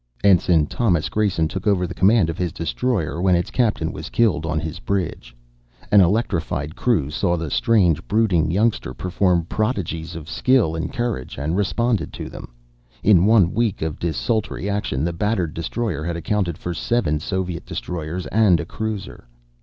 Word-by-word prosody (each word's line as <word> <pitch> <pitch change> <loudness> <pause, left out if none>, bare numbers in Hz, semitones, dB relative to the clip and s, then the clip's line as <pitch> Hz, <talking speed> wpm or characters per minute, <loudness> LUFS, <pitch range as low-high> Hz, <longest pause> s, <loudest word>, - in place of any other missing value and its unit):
Ensign 90 -5 +4
Thomas 90 - 0
Grayson 100 -7 +1
took 95 +5 -5
over 95 -3 +2
the 85 - -5
command 95 -1 +3
of 85 - -8
his 90 -2 -1
destroyer 85 - -2
when 95 -1 +4
its 90 +6 -1
captain 115 -4 0
was - - -7
killed 105 -9 +1
on 80 -1 0
his 80 0 -5
bridge. 90 -5 -3 0.6
An 105 -1 +7
electrified 85 - 0
crew 85 - +1
saw 85 +2 0
the 80 -3 -4
strange, 90 - +2
brooding 100 -8 +2
youngster 100 - 0
perform 90 -2 +1
prodigies 90 -6 -2
of 80 -2 -8
skill 125 -10 +2
and 80 +2 -3
courage, 120 - -3
and 75 +5 -2
responded 110 +3 0
to - - -6
them. - - -10 0.5
In 95 -2 +5
one 105 -6 +4
week 110 -6 0
of 80 -2 -3
desultory 100 +4 -2
action 100 -9 -1
the 85 +1 -1
battered 90 -3 -1
destroyer 85 -1 -3
had 85 +1 -3
accounted 85 -1 -1
for 90 - -4
seven 85 -7 0
Soviet 90 +1 -3
destroyers 85 +1 -4
and 105 -6 +4
a - - -3
cruiser. 105 - -5
90 Hz, 165 wpm, -22 LUFS, 80-105 Hz, 0.6 s, An